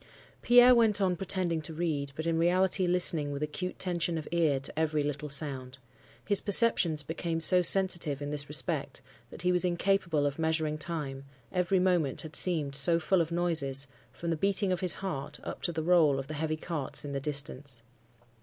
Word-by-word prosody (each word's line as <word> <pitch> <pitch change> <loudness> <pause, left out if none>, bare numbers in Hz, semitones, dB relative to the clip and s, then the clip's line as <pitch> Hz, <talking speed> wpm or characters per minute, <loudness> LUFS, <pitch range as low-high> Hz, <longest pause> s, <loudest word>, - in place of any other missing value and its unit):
"Pierre 245 +1 +6
went 225 -4 +3
on 185 -2 0
pretending 180 -3 -1
to 155 +1 -9
read, 150 -4 -3
but 160 - -6
in 165 -1 -1
reality 185 +2 +1
listening 170 -5 +2
with 140 +1 -5
acute 180 +5 -5
tension 170 -2 -1
of 155 - -7
ear 160 -5 +1
to 140 +3 -4
every 155 -2 -1
little 145 0 -5
sound. 135 -3 0 0.5
His 205 -1 +2
perceptions 190 -7 +4
became 165 +2 -4
so 180 +2 +5
sensitive 175 -5 +3
in 145 0 -6
this 145 -1 -4
respect 150 - -4 0.3
that - - -10
he 180 - +1
was 180 0 0
incapable 175 -4 0
of 145 +2 -3
measuring 160 -1 -1
time, 150 -5 -5 0.3
every 180 +1 0
moment 175 -7 0
had 160 -2 -10
seemed 155 -6 +3
so 165 +5 +3
full 185 +2 +1
of 165 0 -4
noises, 155 -6 +1 0.3
from 170 +5 -6
the 165 - -2
beating 195 +2 0
of 180 - -1
his 180 -3 +6
heart 165 -9 -6
up - - -8
to - - -1
the 160 -1 -4
roll 160 -5 +3
of 135 - -5
the 155 - -8
heavy 155 +1 -3
carts 155 -4 -4
in 145 - -6
the 140 - -3
distance. 140 -3 -3
165 Hz, 190 wpm, -28 LUFS, 145-180 Hz, 0.5 s, Pierre